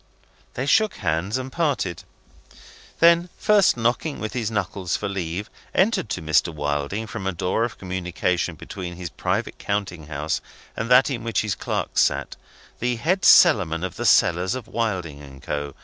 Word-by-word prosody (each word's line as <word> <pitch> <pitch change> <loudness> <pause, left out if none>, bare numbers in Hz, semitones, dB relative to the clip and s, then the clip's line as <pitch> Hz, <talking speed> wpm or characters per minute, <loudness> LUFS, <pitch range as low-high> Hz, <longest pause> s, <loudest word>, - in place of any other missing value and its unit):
They 130 - -2
shook 215 +7 +3
hands 90 +5 -1
and 130 0 -5
parted. 140 - -1 0.9
Then 170 +1 +5
(first 210 - +4
knocking 120 +6 0
with 110 +2 -4
his 120 -5 -1
knuckles 95 -3 -2
for 105 - -3
leave) 95 0 -3 0.3
entered 190 - +2
to 90 - -3
Mr. 80 +1 +2
Wilding 75 +7 -2
from 95 -2 -5
a - - +1
door 90 +5 -1
of 115 -3 -7
communication 90 -1 -2
between 90 +2 -7
his 85 -2 -6
private - - -2
counting 95 -6 -3
house 75 +1 -2 0.3
and 115 - -3
that 125 +3 +6
in 120 -4 -3
which 115 -1 0
his 110 -3 -1
clerks - - -1
sat, - - 0 0.4
the 120 +1 0
Head 175 +11 0
Cellarman 90 - +6
of 95 - -4
the - - -4
cellars 90 +6 +3
of 130 -3 -7
Wilding 90 -11 -3
and 70 -2 -12
Co. 75 0 -4
100 Hz, 165 wpm, -23 LUFS, 85-120 Hz, 0.9 s, that